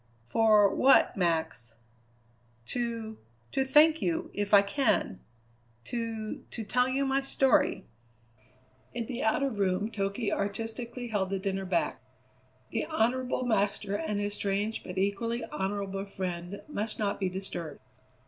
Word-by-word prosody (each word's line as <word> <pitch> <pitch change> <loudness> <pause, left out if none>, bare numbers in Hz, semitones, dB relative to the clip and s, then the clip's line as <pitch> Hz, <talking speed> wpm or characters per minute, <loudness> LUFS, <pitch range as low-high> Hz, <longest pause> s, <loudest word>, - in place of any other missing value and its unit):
"For 215 - +5
what 270 - +5
Max?" 160 - -1 0.9
"To 230 -3 -3 0.3
to 270 - +1
thank 305 +4 +5
you, 330 -1 -1
if 205 0 -2
I 200 -1 +8
can. 200 - 0 0.6
To 225 - -4
to 225 - -5
tell 250 +4 +2
you 275 +2 +1
my 270 0 +1
story." 270 -1 +2 1.1
In 235 -1 -2
the 240 0 -4
outer 275 +5 +1
room 200 0 0
Toky 200 +2 -2
artistically 225 +4 -4
held 200 -4 0
the 195 - -1
dinner 195 0 -2
back. 180 -2 0 0.7
The - - -1
honourable 255 -3 0
master 200 -3 0
and 210 -1 -2
his 205 0 -2
strange 205 +2 -1
but 180 0 -7
equally 200 +5 -1
honourable 195 0 -3
friend 185 -1 -5
must 220 -7 -3
not 205 -2 -1
be 190 -2 0
disturbed. 175 -5 -4
210 Hz, 130 wpm, -29 LUFS, 195-240 Hz, 1.1 s, I